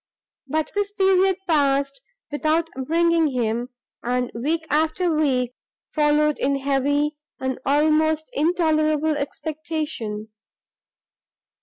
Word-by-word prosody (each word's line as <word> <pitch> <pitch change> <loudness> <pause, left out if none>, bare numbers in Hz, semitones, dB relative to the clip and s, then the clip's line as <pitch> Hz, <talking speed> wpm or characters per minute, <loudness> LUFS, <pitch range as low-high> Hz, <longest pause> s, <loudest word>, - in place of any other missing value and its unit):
But 310 +3 -1
this 410 0 -1
period 385 -2 +3
passed 275 -3 +1 0.3
without 315 +3 0 0.2
bringing 335 0 +3
him; 240 -2 -1 0.3
and 250 0 -1
week 315 +8 -1
after 315 +4 +1
week 260 -5 +1 0.4
followed 300 0 +2
in 275 +1 +1
heavy 285 +2 0 0.2
and 260 0 -2
almost 310 +2 +3
intolerable 310 -1 +2
expectation. 290 -7 -4
300 Hz, 95 wpm, -23 LUFS, 275-320 Hz, 0.4 s, period